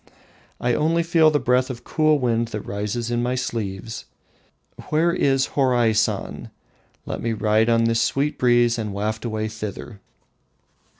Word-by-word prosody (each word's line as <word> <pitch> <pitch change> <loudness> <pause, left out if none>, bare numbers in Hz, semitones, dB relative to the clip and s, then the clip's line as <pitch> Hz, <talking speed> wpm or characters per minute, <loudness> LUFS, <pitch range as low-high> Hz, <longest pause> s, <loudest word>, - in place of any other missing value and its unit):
I 120 0 +1
only 165 +5 +1
feel 165 -1 +4
the 150 - +2
breath 125 +1 +1
of 120 -2 -7
cool 155 -1 +2
wind 120 -3 0
that 105 -2 -5
rises 105 +4 -3
in 120 0 0
my 125 +1 -1
sleeves. 110 -4 -4 0.8
Where 165 +3 +2
is 135 -6 +1
Horaisan? 120 -5 +1 0.6
Let - - -5
me 115 0 -1
ride 110 +1 +2
on 115 0 +3
this 115 0 +2
sweet 140 +4 0
breeze 120 -1 +3
and 105 -2 -4
waft 110 +3 -3
away 110 -1 -2
thither." 110 0 -7
120 Hz, 145 wpm, -22 LUFS, 110-130 Hz, 0.8 s, feel